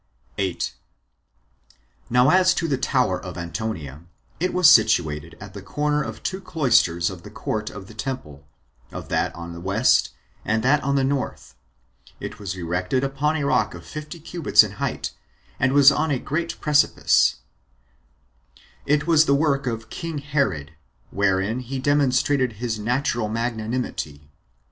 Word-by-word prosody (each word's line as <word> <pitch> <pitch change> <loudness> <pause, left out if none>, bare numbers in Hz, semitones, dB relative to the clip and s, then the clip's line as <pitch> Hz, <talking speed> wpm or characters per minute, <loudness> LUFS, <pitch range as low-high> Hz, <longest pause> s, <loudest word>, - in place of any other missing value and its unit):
8. 95 -3 -2 1.4
Now 125 +4 +4
as 185 0 +4
to 170 - -1
the 145 - +1
tower 125 -7 0
of 90 -1 -7
Antonia, 85 -4 -5 0.4
it 180 +2 0
was 180 -2 +5
situated 85 - +3
at 100 -2 -10
the 100 - -8
corner 150 +8 -1
of 110 -5 -6
two 190 +1 -3
cloisters 115 - +2
of 90 -2 -10
the 105 - -11
court 105 +1 -4
of 100 -2 -9
the 110 - -13
temple; 105 - -6 0.5
of - - -8
that - - 0
on 85 0 -8
the 85 - -8
west, 100 +7 +3 0.3
and 110 +1 0
that 145 +3 +3
on 140 +1 0
the 135 - +2
north; 135 0 -3 0.7
it - - -7
was 95 -2 -5
erected 90 +8 -1
upon 140 +3 0
a 145 - -2
rock 105 -8 +1
of 85 - -11
fifty 155 +2 -8
cubits 165 0 +4
in - - -5
height, - - -2 0.5
and 130 +1 +2
was 140 0 +7
on 155 +3 0
a 140 - +1
great 165 +6 -3
precipice; 150 -1 +3 1.5
it 150 +1 +2
was 160 -1 +5
the 140 - +3
work 140 -2 +1
of 115 -2 -4
king 165 -2 -5
Herod, 135 - -1 0.4
wherein 100 +3 +1
he 130 +2 -5
demonstrated 130 -2 +2
his 110 0 -4
natural 120 -1 -1
magnanimity. 110 - -4
125 Hz, 155 wpm, -23 LUFS, 95-145 Hz, 1.5 s, was